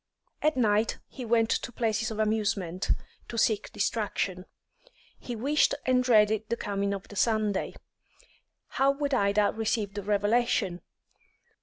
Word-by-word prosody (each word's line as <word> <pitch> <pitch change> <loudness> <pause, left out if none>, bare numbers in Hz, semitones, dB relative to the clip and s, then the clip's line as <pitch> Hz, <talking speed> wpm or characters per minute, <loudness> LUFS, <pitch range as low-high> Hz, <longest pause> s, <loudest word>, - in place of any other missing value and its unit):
At 305 -2 +2
night 215 -2 +2
he 255 - -8
went 225 -1 +2
to - - -1
places 220 -1 -1
of 220 - -6
amusement, 205 -5 -1 0.4
to 235 - -6
seek 220 -2 +1
distraction; 195 -3 -2 0.7
he 245 - -6
wished 280 +7 +2
and 255 -1 +3
dreaded 215 -3 +3
the 235 - -1
coming 200 -1 -2
of 195 -1 -5
the 205 - -10
Sunday. 215 -2 0 0.9
How 270 +1 +2
would 280 0 -1
Ida 205 -3 +2
receive 220 -2 -1
the 205 - -4
revelation? 205 -2 +1
215 Hz, 135 wpm, -28 LUFS, 205-235 Hz, 0.9 s, and